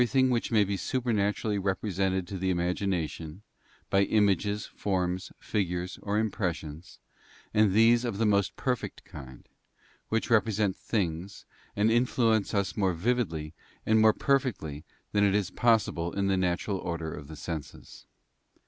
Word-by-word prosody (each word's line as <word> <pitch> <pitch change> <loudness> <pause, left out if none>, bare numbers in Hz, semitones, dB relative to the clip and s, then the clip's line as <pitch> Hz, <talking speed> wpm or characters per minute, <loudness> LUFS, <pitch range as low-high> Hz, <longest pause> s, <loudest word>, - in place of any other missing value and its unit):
115 125 +2 +2
thing 130 - +2
which 120 -2 0
may 110 -2 +5
be 100 0 -2
supernaturally 105 -2 0
represented 95 -1 -1
to 95 - -6
the 95 +1 0
imagination 85 -1 -2 0.5
by 95 - +4
images, 100 0 +2
forms, 90 -2 -2
figures, 90 -3 -2
or 105 +1 -1
impressions, 90 -7 -3 0.6
and 105 -2 +4
these 115 +4 +5
of 115 -5 -2
the 115 - +1
most 100 -2 +2
perfect 125 -3 -3
kind, 65 -3 -11 0.6
which 115 +2 -1
represent 105 -3 +2
things, 95 -2 -3 0.3
and 105 +2 +3
influence 115 -3 +2
us 100 -2 0
more 95 -4 +1
vividly 85 -7 -1 0.3
and 110 0 +4
more 110 0 +7
perfectly 110 - -1 0.3
than 105 -1 +2
it 100 -1 +3
is 105 -3 0
possible 110 -7 +2
in 100 0 0
the 95 -1 +2
natural 95 +2 -1
order 85 -3 -4
of 70 - -9
the 80 - -9
senses. 80 -2 -8
100 Hz, 145 wpm, -28 LUFS, 90-110 Hz, 0.6 s, more